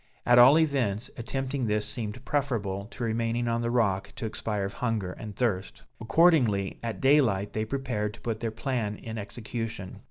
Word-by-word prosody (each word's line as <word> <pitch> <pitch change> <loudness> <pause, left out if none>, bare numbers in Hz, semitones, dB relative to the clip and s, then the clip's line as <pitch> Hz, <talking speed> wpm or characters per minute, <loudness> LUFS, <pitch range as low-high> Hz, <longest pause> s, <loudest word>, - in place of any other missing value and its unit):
At 120 0 +6
all 130 +5 +9
events, 130 -9 +1
attempting 130 +1 -2
this 105 0 0
seemed 105 -1 -5
preferable 110 -9 -1
to 120 +3 -7
remaining 115 +1 0
on 115 0 0
the 120 - -1
rock 100 -5 +1
to - - -5
expire 105 -2 -2
of 100 - -5
hunger 110 -7 -1
and 105 -3 -8
thirst. 100 -6 -1 0.2
Accordingly, 115 - +3
at 115 -4 -4
daylight 115 -8 +3
they 110 0 -1
prepared 110 -5 -2
to - - -18
put 115 -2 -3
their 115 - -1
plan 115 -2 -2
in 110 +1 -6
execution. 110 -2 -5
115 Hz, 170 wpm, -28 LUFS, 105-125 Hz, 0.2 s, all